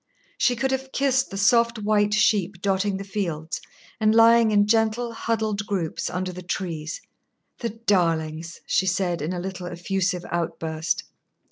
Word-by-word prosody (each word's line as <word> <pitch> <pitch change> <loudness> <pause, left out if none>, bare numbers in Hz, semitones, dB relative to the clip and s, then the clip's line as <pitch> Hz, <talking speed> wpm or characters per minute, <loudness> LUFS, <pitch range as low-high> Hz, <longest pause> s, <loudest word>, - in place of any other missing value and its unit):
She 245 - +3
could 265 +3 0
have 265 0 -2
kissed 265 -1 +1
the 195 - -6
soft 235 +3 +3
white 210 0 +2
sheep 205 -3 +2
dotting 195 0 +1
the 195 - -5
fields 175 -6 -3 0.4
and 215 0 +3
lying 230 0 +6
in 205 -1 +4
gentle, 225 +2 +1
huddled 220 -3 -1
groups 180 -6 -2
under 180 0 -3
the 180 - -7
trees. 170 -3 -4 0.6
"The 235 - -2
darlings!" 170 -7 -1
she 190 - +1
said, 180 -2 0
in 155 +4 -2
a 180 - -3
little, 185 0 -5
effusive 180 +1 -2
outburst. 165 -1 -2
195 Hz, 150 wpm, -24 LUFS, 175-220 Hz, 0.6 s, lying